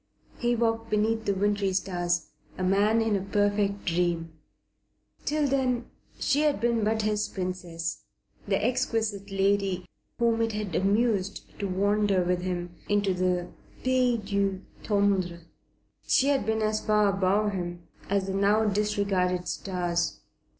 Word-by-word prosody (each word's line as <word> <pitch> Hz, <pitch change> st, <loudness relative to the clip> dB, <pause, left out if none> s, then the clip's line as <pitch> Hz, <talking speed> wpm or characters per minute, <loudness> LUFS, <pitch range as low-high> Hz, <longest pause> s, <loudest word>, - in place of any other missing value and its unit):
He 240 Hz, 0 st, +1 dB
walked 225 Hz, -1 st, 0 dB
beneath 220 Hz, +1 st, +1 dB
the 200 Hz, -, +1 dB
wintry 200 Hz, 0 st, +1 dB
stars, 175 Hz, -3 st, -1 dB, 0.3 s
a 185 Hz, -, -2 dB
man 205 Hz, +4 st, +3 dB
in 220 Hz, -2 st, +1 dB
a 195 Hz, -, 0 dB
perfect 205 Hz, 0 st, 0 dB
dream. 170 Hz, -2 st, 0 dB, 0.9 s
Till 300 Hz, 0 st, +1 dB
then 255 Hz, -3 st, +1 dB, 0.3 s
she 285 Hz, +1 st, +1 dB
had 300 Hz, -5 st, +2 dB
been 235 Hz, 0 st, +1 dB
but 220 Hz, +1 st, +1 dB
his 210 Hz, 0 st, 0 dB
Princess, 175 Hz, -, -4 dB, 0.5 s
the 195 Hz, -, +2 dB
exquisite 225 Hz, -5 st, -1 dB
lady 195 Hz, -2 st, +1 dB, 0.3 s
whom 230 Hz, -1 st, +2 dB
it 225 Hz, -1 st, 0 dB
had 210 Hz, -4 st, -3 dB
amused 200 Hz, +1 st, +1 dB, 0.2 s
to 200 Hz, -, -1 dB
wander 200 Hz, 0 st, +2 dB
with 180 Hz, 0 st, 0 dB
him 175 Hz, -1 st, -3 dB, 0.2 s
into 205 Hz, -2 st, +2 dB
the 180 Hz, -1 st, 0 dB, 0.3 s
pays 255 Hz, -2 st, +2 dB
du 200 Hz, -2 st, -1 dB, 0.2 s
tendre. 195 Hz, -4 st, +1 dB, 0.7 s
She 275 Hz, -, +4 dB
had 275 Hz, -4 st, +1 dB
been 220 Hz, 0 st, +1 dB
as 215 Hz, 0 st, 0 dB
far 210 Hz, -1 st, +3 dB
above 195 Hz, +2 st, +2 dB
him 175 Hz, -2 st, -4 dB, 0.3 s
as 200 Hz, -1 st, +1 dB
the 190 Hz, -, -3 dB
now 205 Hz, +3 st, +3 dB
disregarded 200 Hz, -3 st, 0 dB
stars. 175 Hz, -3 st, -2 dB
200 Hz, 140 wpm, -27 LUFS, 185-220 Hz, 0.9 s, She